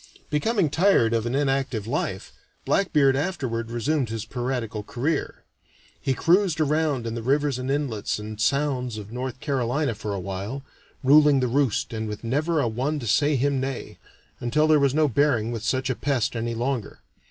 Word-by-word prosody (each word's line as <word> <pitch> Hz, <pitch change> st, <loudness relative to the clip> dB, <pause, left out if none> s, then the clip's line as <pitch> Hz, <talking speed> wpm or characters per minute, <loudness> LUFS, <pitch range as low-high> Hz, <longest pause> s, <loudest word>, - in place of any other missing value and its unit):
Becoming 175 Hz, +1 st, +1 dB
tired 160 Hz, -, +3 dB
of 115 Hz, 0 st, 0 dB
an 120 Hz, -, -1 dB
inactive 135 Hz, -6 st, 0 dB
life, 110 Hz, -6 st, -3 dB, 0.3 s
Blackbeard 150 Hz, -8 st, +3 dB
afterward 130 Hz, -8 st, -2 dB
resumed 120 Hz, +3 st, 0 dB
his 115 Hz, 0 st, -4 dB
piratical 120 Hz, -3 st, -3 dB
career. 130 Hz, +9 st, -3 dB, 0.6 s
He 135 Hz, -2 st, 0 dB
cruised 175 Hz, 0 st, +3 dB
around 150 Hz, -4 st, +1 dB
in 115 Hz, -, -3 dB
the 115 Hz, -, -4 dB
rivers 140 Hz, +2 st, +1 dB
and 130 Hz, +1 st, -4 dB
inlets 135 Hz, -7 st, -1 dB
and 105 Hz, 0 st, -7 dB
sounds 125 Hz, -2 st, 0 dB
of 105 Hz, 0 st, -8 dB
North 125 Hz, +1 st, -4 dB
Carolina 135 Hz, -1 st, 0 dB
for 105 Hz, 0 st, -5 dB
a -, -, -3 dB
while, 100 Hz, +8 st, -5 dB, 0.4 s
ruling 145 Hz, +1 st, +6 dB
the 130 Hz, -, +1 dB
roost 130 Hz, -2 st, 0 dB
and 110 Hz, 0 st, -3 dB
with 105 Hz, +1 st, -6 dB
never 150 Hz, +7 st, 0 dB
a 130 Hz, -, +1 dB
one 130 Hz, +7 st, -1 dB
to 130 Hz, -, -5 dB
say 145 Hz, +7 st, +3 dB
him 140 Hz, +1 st, +1 dB
nay, 135 Hz, -1 st, -5 dB, 0.4 s
until 120 Hz, +6 st, +1 dB
there 155 Hz, -1 st, +5 dB
was 140 Hz, -1 st, +2 dB
no 155 Hz, -1 st, +4 dB
bearing 125 Hz, -4 st, +1 dB
with 115 Hz, -2 st, -4 dB
such 130 Hz, +4 st, 0 dB
a 130 Hz, -, +1 dB
pest 130 Hz, -4 st, -1 dB
any 115 Hz, 0 st, -2 dB
longer. 120 Hz, -2 st, -3 dB
130 Hz, 175 wpm, -25 LUFS, 115-145 Hz, 0.6 s, ruling